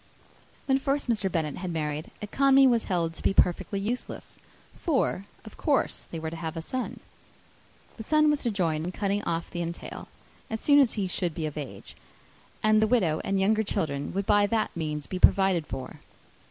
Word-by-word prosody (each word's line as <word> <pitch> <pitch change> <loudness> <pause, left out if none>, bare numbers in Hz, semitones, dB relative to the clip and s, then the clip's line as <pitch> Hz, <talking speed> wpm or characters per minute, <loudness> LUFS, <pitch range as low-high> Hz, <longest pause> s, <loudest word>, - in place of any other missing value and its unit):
When 265 0 +2
first 275 +1 -1
Mr. 205 -4 0
Bennet 155 -4 -1
had 180 -1 -4
married, 150 -1 -3
economy 270 +5 +5
was 235 -3 +3
held 170 -4 0
to - - -10
be 195 - +1
perfectly 180 +3 +2
useless; 230 +5 -4 0.4
for, 265 - 0 0.2
of 215 - -12
course, 290 -3 +1
they 165 - -7
were 160 0 -4
to - - -6
have 160 -1 -4
a - - -2
son. 255 +7 -4 1.0
This 220 - -8
son 305 0 +4
was 295 - 0
to 240 - 0
join 165 -7 0
in 180 +2 -4
cutting 200 0 -1
off 170 0 -2
the 175 - -3
entail, 170 0 -6 0.4
as 220 - -3
soon 290 +3 +5
as 270 -5 +4
he 200 -3 -1
should 175 -3 -2
be 160 - -2
of 150 - -4
age, 145 -4 -8 0.7
and 215 0 +4
the 220 - +4
widow 185 -10 +2
and 195 0 0
younger 215 +3 +3
children 155 -9 -2
would 195 0 -1
by 205 0 +4
that 220 0 -1
means 150 -3 -3
be 185 - -5
provided 185 -5 +4
for. 130 - -7
195 Hz, 195 wpm, -27 LUFS, 165-220 Hz, 1.0 s, economy